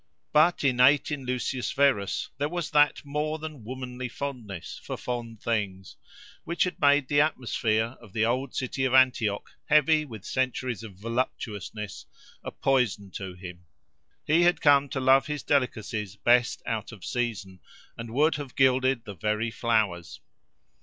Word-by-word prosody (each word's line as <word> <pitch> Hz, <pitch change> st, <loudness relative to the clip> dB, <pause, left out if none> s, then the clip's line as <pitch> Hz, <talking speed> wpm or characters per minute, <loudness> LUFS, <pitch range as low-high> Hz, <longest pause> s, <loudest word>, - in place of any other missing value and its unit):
But 155 Hz, +3 st, +4 dB
innate 130 Hz, +2 st, +4 dB
in 140 Hz, -4 st, -4 dB
Lucius 125 Hz, 0 st, -2 dB
Verus 135 Hz, -9 st, +1 dB
there 145 Hz, +1 st, 0 dB
was 175 Hz, -1 st, -4 dB
that 150 Hz, -1 st, +3 dB
more 150 Hz, +2 st, -2 dB
than 155 Hz, -6 st, -8 dB
womanly 125 Hz, +1 st, -6 dB
fondness 120 Hz, -10 st, -6 dB
for -, -, -5 dB
fond 115 Hz, -3 st, -5 dB
things, 100 Hz, -5 st, -2 dB, 0.5 s
which 170 Hz, +1 st, 0 dB
had 180 Hz, -, -4 dB
made 145 Hz, -1 st, +4 dB
the 145 Hz, +1 st, +4 dB
atmosphere 115 Hz, -5 st, 0 dB
of 110 Hz, -5 st, -15 dB
the 110 Hz, +3 st, +1 dB
old 125 Hz, +3 st, -1 dB
city 130 Hz, +1 st, -2 dB
of 130 Hz, 0 st, +2 dB
Antioch, 120 Hz, -6 st, +3 dB
heavy 155 Hz, 0 st, +4 dB
with 110 Hz, -9 st, -10 dB
centuries 130 Hz, -4 st, -2 dB
of 110 Hz, -4 st, -10 dB
voluptuousness, 105 Hz, -2 st, -4 dB, 0.4 s
a -, -, -4 dB
poison 120 Hz, -7 st, 0 dB
to 95 Hz, 0 st, -6 dB
him: 90 Hz, -1 st, -10 dB, 0.6 s
he 160 Hz, +3 st, +4 dB
had 175 Hz, 0 st, +4 dB
come 140 Hz, -2 st, +4 dB
to 130 Hz, -, -3 dB
love 130 Hz, +1 st, +4 dB
his 150 Hz, -4 st, -4 dB
delicacies 110 Hz, -7 st, -1 dB
best 120 Hz, +3 st, +2 dB
out 110 Hz, -2 st, -3 dB
of 105 Hz, -5 st, -11 dB
season, 105 Hz, -6 st, -3 dB, 0.4 s
and 115 Hz, 0 st, -7 dB
would 150 Hz, +6 st, +3 dB
have 145 Hz, -3 st, -8 dB
gilded 130 Hz, -2 st, +3 dB
the 100 Hz, -, -7 dB
very 105 Hz, +5 st, -1 dB
flowers. 110 Hz, -8 st, -1 dB
125 Hz, 155 wpm, -27 LUFS, 110-140 Hz, 0.6 s, But